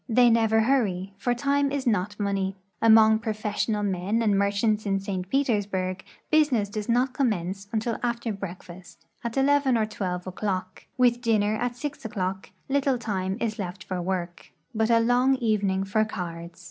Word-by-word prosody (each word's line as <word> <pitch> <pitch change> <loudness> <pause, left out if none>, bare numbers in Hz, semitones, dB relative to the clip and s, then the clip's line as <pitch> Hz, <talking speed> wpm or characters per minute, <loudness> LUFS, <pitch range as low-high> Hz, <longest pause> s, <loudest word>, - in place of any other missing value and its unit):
They 240 +1 +5
never 225 -1 +3
hurry, 200 -7 0
for 245 +2 0
time 280 +2 +1
is 280 -1 -2
not 205 -2 0
money. 195 -1 -1 0.3
Among 220 -1 +6
professional 215 -1 -2
men 200 +4 0
and 210 -3 +3
merchants 200 +2 +1
in 195 0 +1
St. 190 -2 -4
Petersburg 205 -8 0 0.3
business 280 -10 +3
does 210 +2 -5
not 250 +2 +2
com 270 -2 +2
mence 195 0 -4
until 225 0 -1
after 235 -2 -2
breakfast, 180 -2 -10 0.2
at 235 +2 -4
11 275 -2 +3
or 220 - +2
12 185 -4 -4
o'clock; 185 -1 -4
with 245 -1 +3
dinner 215 -3 +2
at 245 +2 -2
6 290 +3 -6
o'clock, 190 -3 -3 0.2
little 275 -1 +1
time 195 -4 -2
is 215 -2 -2
left 185 -1 -5
for 185 -1 -4
work, 175 -1 -4 0.2
but 220 0 +1
a 230 -1 +5
long 245 +3 +3
evening 205 -6 0
for 200 +3 +1
cards. 170 -5 -6
215 Hz, 165 wpm, -26 LUFS, 190-240 Hz, 0.3 s, Among